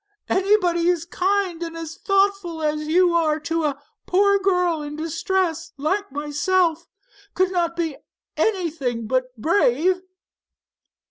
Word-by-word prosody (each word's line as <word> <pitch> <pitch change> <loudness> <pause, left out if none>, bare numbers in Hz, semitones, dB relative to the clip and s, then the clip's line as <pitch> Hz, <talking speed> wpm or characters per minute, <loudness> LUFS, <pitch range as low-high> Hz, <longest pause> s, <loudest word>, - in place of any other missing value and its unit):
Anybody 365 -3 +2
as 340 -2 0
kind 370 -1 0
and 330 -1 -5
thoughtful 390 -1 0
as 305 0 -1
you 350 +2 +4
are 315 -2 +2
to 325 +1 -1
a 280 -2 -1 0.3
poor 400 +2 +4
girl 360 -4 +1
in 295 0 -6
distress 330 +1 -2
like 375 +6 -1
myself, 320 +4 0 0.5
could 370 0 +2
not 340 -2 0
be 325 -4 -2 0.4
anything 310 - -1
but 255 +3 +1
brave." 340 - +2
335 Hz, 120 wpm, -22 LUFS, 310-375 Hz, 0.5 s, you